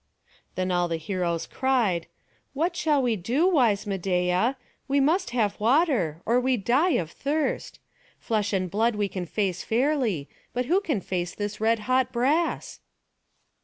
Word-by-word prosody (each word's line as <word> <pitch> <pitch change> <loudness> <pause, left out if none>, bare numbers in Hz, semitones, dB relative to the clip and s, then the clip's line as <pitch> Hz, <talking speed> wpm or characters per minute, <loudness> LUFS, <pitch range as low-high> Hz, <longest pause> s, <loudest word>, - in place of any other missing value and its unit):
Then 185 0 -1
all 175 -1 +1
the 165 -1 -2
heroes 170 0 -2
cried, 230 -11 0 0.5
"What 335 +5 0
shall 295 -5 +2
we 240 -3 +1
do, 245 - +1
wise 245 - +3
Medeia? 185 +4 0 0.3
We 280 +1 +2
must 310 +2 +2
have 225 -4 0
water, 225 - +2
or 240 +2 +3
we 255 0 +1
die 265 - +2
of 165 -2 -3
thirst. 295 - -2 0.4
Flesh 210 -3 -1
and 185 -3 -1
blood 225 +3 +1
we 205 -1 0
can 185 -2 -5
face 195 -1 -1
fairly; 235 - 0 0.3
but 250 +1 -1
who 360 +9 +2
can 295 - -1
face 175 -1 -3
this 205 0 -4
red 225 0 +2
hot 255 +2 +1
brass?" 275 +8 0
225 Hz, 155 wpm, -26 LUFS, 185-270 Hz, 0.5 s, wise